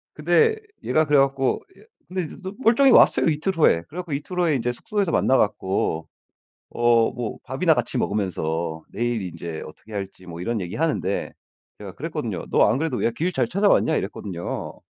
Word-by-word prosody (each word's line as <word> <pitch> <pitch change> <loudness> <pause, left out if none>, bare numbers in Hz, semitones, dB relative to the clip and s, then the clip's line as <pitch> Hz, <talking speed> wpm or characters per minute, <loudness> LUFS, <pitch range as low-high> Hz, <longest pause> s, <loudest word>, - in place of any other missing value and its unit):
근데 455 -1 +3 0.3
얘가 155 0 +2
그래 145 -1 +3
갖고 135 -1 +1 0.2
예 - - -18 0.2
근데 185 0 -2
이제 155 - -8
또 190 +2 -5
멀쩡히 260 +3 +5
왔어요 - - +6
이틀 160 +6 0
후에. 85 - +4
그래 170 - -11
갖고 170 -5 -5
이틀 180 +6 -4
후에 165 -5 +3
인제 125 -1 0
숙소에서 200 - -2
만나 135 - +3
갖고 95 -5 0 0.6
어 120 -1 +3
뭐 120 -3 -5
밥이나 - - +2
같이 - - -2
먹으면서 80 -5 -2
내일 120 -1 -1
인제 85 -2 -6
어떻게 105 +7 -14
할지 95 -2 -6
뭐 85 0 -8
이런 115 +3 -2
얘기하는데 100 - -1 0.5
제가 - - -8
그랬거든요. - - -4
"너 - - +4
안 125 - +1
그래도 155 -5 -1
왜 115 - +1
길 175 +9 -1
잘 - - +1
찾아왔냐?" 195 -4 +3
이랬거든요. 95 -3 -5
120 Hz, 375 characters per minute, -23 LUFS, -, 0.6 s, 왔어요